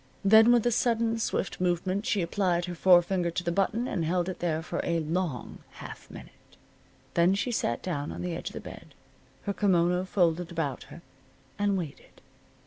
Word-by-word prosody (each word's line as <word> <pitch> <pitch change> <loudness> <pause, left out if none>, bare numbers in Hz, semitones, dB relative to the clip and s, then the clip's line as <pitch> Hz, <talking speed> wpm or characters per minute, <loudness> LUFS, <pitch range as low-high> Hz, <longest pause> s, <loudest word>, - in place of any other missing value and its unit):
Then 220 +3 +7
with 240 -2 +4
a 240 - +3
sudden 230 0 +1
swift 195 -4 -2
movement 185 +4 0
she 210 -8 +1
applied 175 0 0
her 180 - -5
forefinger 175 0 +4
to 175 +2 -3
the 170 - -1
button 215 +7 0
and 175 - -2
held 175 +2 0
it 185 - -6
there 165 -2 -1
for 175 - -3
a 170 -1 0
long 160 -4 -3
half - - -10
minute. - - -11 0.8
Then 175 +3 +3
she 245 +5 -1
sat 120 - -1
down 145 -5 -3
on - - -6
the 180 -1 -3
edge - - -5
of - - -14
the - - -5
bed, - - -11 0.5
her 200 - -2
kimono 180 -2 +2
folded 175 -2 +1
about 160 -6 -3
her, - - -12 0.6
and 205 -1 +1
waited. 165 -6 -8
180 Hz, 185 wpm, -28 LUFS, 170-200 Hz, 0.8 s, Then